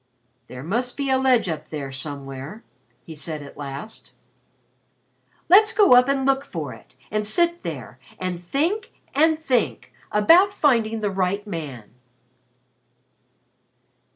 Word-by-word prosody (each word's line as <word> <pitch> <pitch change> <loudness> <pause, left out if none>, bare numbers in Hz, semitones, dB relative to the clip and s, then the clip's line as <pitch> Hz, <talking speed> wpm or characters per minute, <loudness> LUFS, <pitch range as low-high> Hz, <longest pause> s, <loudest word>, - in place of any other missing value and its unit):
"There 125 +1 -9
must 240 +9 -2
be 280 -2 -1
a 260 - +3
ledge 255 -6 +3
up 160 -3 -4
there 140 -3 -5
somewhere," 140 - -7 0.4
he 165 - -9
said 155 0 -5
at 140 - -12
last. 140 +8 -8 1.3
"Let's 425 +5 +6
go 410 - +6
up 250 +2 +5
and 270 -1 +1
look 275 0 +2
for 155 - -6
it 115 - -17 0.2
and 210 0 -1
sit 345 +7 +1
there 130 -6 -7 0.2
and 180 -1 -4
think 320 - -1 0.2
and 315 +3 +4
think 275 -6 -1 0.2
about 345 - +5
finding 225 - +2
the 205 -1 0
right 190 +2 -1
man." 150 - -7
210 Hz, 130 wpm, -23 LUFS, -, 1.3 s, Let's